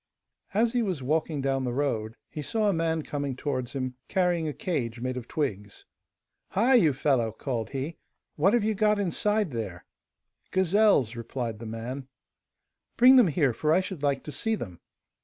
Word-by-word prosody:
As 230 +2 +3
he 245 - +2
was 185 - -2
walking 155 +1 0
down 135 -1 0
the 125 - -1
road, 115 -6 -1
he 150 - -6
saw 215 +7 0
a 200 - +3
man 165 -1 0
coming 140 -3 -3
towards 130 -2 -3
him, 130 -2 -3
carrying 175 -4 +1
a - - -1
cage 125 -8 -3
made 130 +1 -2
of 125 -2 -6
twigs. 105 -9 -3 0.6
'Hi! 235 +7 +2
you 185 - +6
fellow!' 130 -4 +1
called 115 0 -3
he, 140 +4 -4 0.4
'what 190 +8 +3
have 240 -3 +3
you 220 +1 +1
got 210 0 +2
inside 205 0 0
there?' 100 -8 -5 0.6
'Gazelles,' 190 - +3
replied 115 -1 -4
the 115 - -7
man. 120 +4 -5 0.9
'Bring 255 +2 +8
them 250 -6 +7
here, 145 -5 +2
for 155 +6 0
I 165 - +5
should 185 -5 -6
like 140 -2 0
to 150 - -7
see 225 +8 -1
them. 90 - -7
145 Hz, 175 wpm, -27 LUFS, 125-190 Hz, 0.9 s, Bring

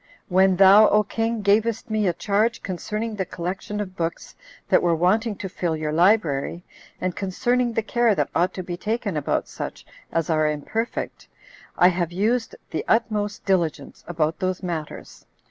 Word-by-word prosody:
When 190 +1 +4
thou, 200 +3 +7
O 210 0 +4
king, 225 +1 -2
gavest 220 +3 +1
me 215 -2 +1
a 175 - +2
charge 210 +6 0
concerning 210 +4 -4
the 190 - 0
collection 185 +4 -5
of 190 -3 -5
books 165 -1 -4 0.3
that - - +4
were 170 -1 +2
wanting 210 +6 +1
to 190 - -6
fill 175 -3 -2
your 155 -1 -2
library, 170 -3 +2 0.4
and 185 -1 -2
concerning 240 +5 0
the 225 - 0
care 235 -1 +2
that 145 -4 -1
ought 180 +2 +2
to 185 - -4
be 175 0 -5
taken 215 -1 -2
about 150 - -1
such - - -7 0.3
as 165 -2 0
are 155 -2 +2
imperfect, 220 +10 -4 0.5
I 180 - +6
have 175 -2 -1
used 225 +6 0 0.2
the - - -2
utmost 210 -2 0
diligence 175 -5 -1
about 160 -2 -1
those 185 0 -2
matters. 165 -4 -6
190 Hz, 165 wpm, -23 LUFS, 170-215 Hz, 0.5 s, thou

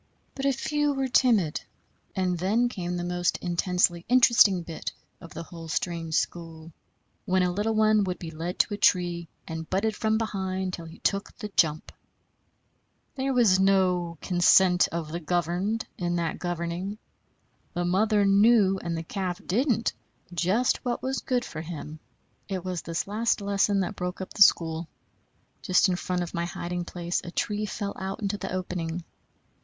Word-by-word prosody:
But 275 0 -2
a - - +4
few 295 +2 0
were 270 -1 0
timid; 225 - +3 0.5
and 185 -1 0
then 220 +7 +2
came 180 -5 -4
the 175 - -3
most 175 0 0
intensely 175 -1 +1
interesting 220 -7 +5
bit 165 -1 -5 0.3
of 165 -2 -12
the 165 - -5
whole 165 -1 -10
strange 165 0 -2
school, 165 -1 -3 0.5
when 185 0 +2
a 180 - +1
little 210 +4 -1
one 215 -1 +4
would 180 -1 -3
be 165 -2 -7
led 165 +3 -5
to 210 - +2
a - - -3
tree 175 -3 +2 0.2
and 160 -1 -6
butted 210 +3 0
from 220 0 +1
behind 190 -4 -2
till 170 - -6
he 160 - -12
took 200 0 -2
the 210 -3 -6
jump. 155 -1 +2 1.2
There 270 0 -1
was 230 -7 +4
no 180 -3 +2
"consent 180 0 +5
of 165 -2 -5
the 170 - -3
governed" 175 +6 -1
in 175 -1 -1
that 170 -2 -2
governing. 175 +3 -3 0.8
The 175 0 0
mother 205 +3 +2
knew, 200 -1 +5
and 170 -1 -3
the 165 - -4
calf 180 +1 -3
didn't, 230 +2 +1 0.4
just 190 +8 +1
what 245 -2 -2
was 265 +1 -1
good 250 -2 -1
for 155 - -6
him. 155 -1 -7 0.5
It 190 -2 -3
was 180 -2 -3
this 165 -1 -3
last 225 +4 +1
lesson 200 0 +1
that 195 +3 -3
broke 180 0 -4
up 190 - -7
the - - -6
school. 165 -3 +5 0.7
Just 185 +1 +3
in 180 - +1
front 180 0 -2
of 170 - -7
my 170 0 -1
hiding 175 +1 -4
place 175 0 -3
a - - -7
tree 210 +4 -2
fell 200 0 -4
out 190 0 -4
into 205 -1 -2
the - - -5
opening. 180 -2 -3
185 Hz, 170 wpm, -27 LUFS, 170-210 Hz, 1.2 s, interesting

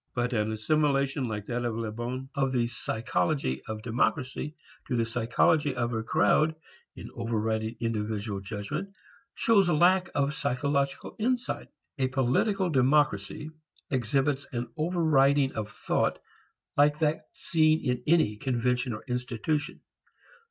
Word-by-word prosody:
But 125 0 0
an 110 -1 +1
assimilation 140 +4 +1
like 105 -2 -4
that 120 +2 -2
of 120 -2 -1
Le 115 -1 -3
Bon 125 +4 -4
of 135 -2 0
the 120 -2 +2
psychology 120 - -1
of 110 -1 -5
democracy 130 +4 -1 0.3
to 125 - -1
the 115 -1 +2
psychology 125 +5 +2
of 120 -1 -1
a 110 - -1
crowd 150 +9 +3 0.4
in - - -9
overriding 110 -1 -1
individual 105 -2 -2
judgment 105 - -4 0.5
shows 200 -5 +4
lack 175 +3 +4
of 140 0 +1
psychological 140 -1 -1
insight. 245 +2 -1 0.3
A 130 - +2
political 135 - +1
democracy 135 -1 +2 0.4
exhibits 135 +2 0
an 120 -1 -3
overriding 150 -5 +3
of 105 -1 -4
thought 105 - 0 0.6
like 145 +1 +4
that 155 0 0
seen 155 -2 +2
in 125 -1 0
any 150 -10 +3
convention 125 +1 0
or 105 - -7
institution. 125 +4 -2
130 Hz, 130 wpm, -28 LUFS, 115-150 Hz, 0.6 s, shows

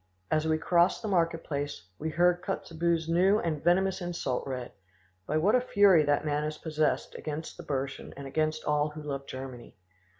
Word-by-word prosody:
As 155 0 +2
we 160 0 +2
crossed 175 +5 +2
the - - -2
market 165 -4 +1
place 145 - -4
we 160 - -2
heard 175 +2 +3
Kotzebue's 165 -1 -1
new 185 +5 +4
and 160 -7 -2
venomous 190 +3 +2
insult 170 -9 -2
read. 125 -2 -4 0.6
By 155 - +1
what 185 +7 +3
a 250 - +5
fury 200 -8 +5
that 145 +1 +1
man 150 0 0
is 155 0 -3
possessed 155 -2 -1
against 155 +1 -5
the 175 - -9
Burschen 140 -3 -4
and 140 - -7
against 155 +3 -1
all 150 0 +2
who 150 0 -9
love 140 -2 -5
Germany!" 130 -4 -8
155 Hz, 180 wpm, -29 LUFS, 145-175 Hz, 0.6 s, a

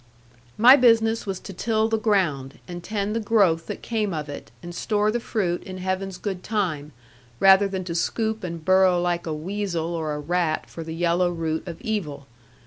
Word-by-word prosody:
My 245 +5 +9
business 230 -4 +3
was 190 -2 -3
to 195 - -9
till 220 +3 0
the 225 0 0
ground, 170 -11 0
and 175 -1 -7
tend 210 +2 -2
the - - +1
growth 200 -7 +2
that - - -6
came 215 -6 -1
of 150 -1 -5
it, 145 - -8
and 175 0 -7
store 210 +3 0
the 240 - -1
fruit 190 -7 -2
in 185 0 -8
Heaven's 185 0 -3
good 190 -2 -4
time, 175 -10 -2 0.5
rather 195 +1 +6
than 190 -1 -4
to 175 -1 -5
scoop 220 +6 -1
and 170 -3 -6
burrow 185 -1 +4
like 175 -1 -1
a - - -2
weasel 175 0 -3
or 155 -3 -2
a - - -4
rat 165 +1 -1
for 165 - -7
the 160 0 -6
yellow 175 +1 +2
root 165 -1 -3
of 170 -2 -7
evil. 150 -11 -3
185 Hz, 195 wpm, -24 LUFS, 165-210 Hz, 0.5 s, My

